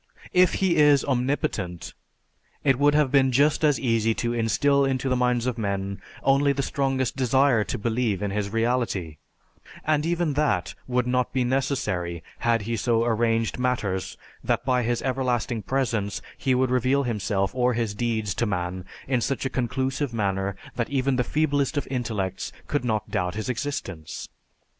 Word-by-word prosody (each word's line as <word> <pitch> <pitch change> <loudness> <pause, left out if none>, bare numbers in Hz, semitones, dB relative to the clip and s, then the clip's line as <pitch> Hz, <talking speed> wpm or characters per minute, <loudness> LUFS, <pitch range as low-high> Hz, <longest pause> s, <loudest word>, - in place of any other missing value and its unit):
If 180 -1 +5
He 190 -3 +2
is 145 -2 +5
omnipotent, 120 - -1 0.7
it 135 -2 +3
would 145 +1 +4
have 150 -3 +3
been 135 -2 +4
just 145 +5 +3
as 150 -2 +3
easy 115 -2 +1
to 120 0 -1
instill 120 +5 +2
into 135 0 0
the 130 - +2
minds 125 -1 +1
of 125 -2 -2
men 100 -2 -2 0.2
only 140 +1 +4
the 140 0 -2
strongest 135 -2 -1
desire 130 -2 +3
to - - -3
believe 110 -2 -1
in 100 - -1
His 100 0 -2
reality; 115 -8 -1 0.7
and 150 -1 +2
even 170 -2 0
that 150 +1 0
would 125 -1 +1
not 125 0 0
be 130 -1 +1
necessary 105 - -1 0.2
had 115 -2 +1
He 115 +2 -2
so 115 +1 +2
arranged 115 0 +1
matters 105 -7 -1 0.3
that 120 0 0
by 125 -1 +2
His 120 0 -1
everlasting 125 -3 -1
presence 115 -4 -1 0.2
He 130 -2 +1
would 130 0 +1
reveal 130 +3 +2
Himself 105 -4 -1
or 125 -1 +2
His 115 -3 -1
deeds 110 -2 -1
to 120 - +2
man 90 -1 -3 0.2
in 130 -2 +1
such 135 +3 -1
a 135 - -1
conclusive 130 +1 -1
manner 100 -2 -1 0.2
that 120 - -1
even 135 -1 +1
the 125 - +2
feeblest 145 0 0
of 145 - -1
intellects 110 -7 -2
could 145 -3 -1
not 110 -3 -1
doubt 90 0 -1
His 110 +3 -3
existence. 110 - -4
125 Hz, 165 wpm, -25 LUFS, 110-135 Hz, 0.7 s, If